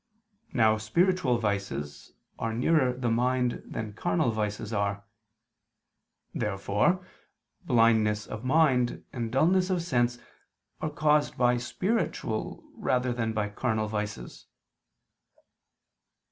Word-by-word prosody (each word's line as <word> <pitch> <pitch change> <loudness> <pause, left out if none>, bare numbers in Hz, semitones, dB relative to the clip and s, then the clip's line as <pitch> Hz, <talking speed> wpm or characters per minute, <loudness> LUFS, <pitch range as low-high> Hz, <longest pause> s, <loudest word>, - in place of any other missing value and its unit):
Now 110 -4 +3
spiritual 145 - +2
vices 95 -10 -3 0.3
are 115 0 -2
nearer 130 +1 +3
the 125 -2 -2
mind 125 +1 +1
than 110 -1 -5
carnal 95 +3 0
vices 105 0 -3
are. 100 -1 -1 1.3
Therefore 105 - 0 0.6
blindness 110 -3 +3
of 105 - -7
mind 130 -3 +2
and 115 -3 -3
dulness 180 +7 +3
of 180 -3 0
sense 120 -6 +1 0.6
are 155 - -2
caused 150 0 +1
by 125 -1 +3
spiritual 120 - -2
rather 125 -1 0
than 115 -2 -1
by 105 -1 -1
carnal 110 0 -1
vices. 105 - -5
120 Hz, 105 wpm, -28 LUFS, 105-130 Hz, 1.3 s, Now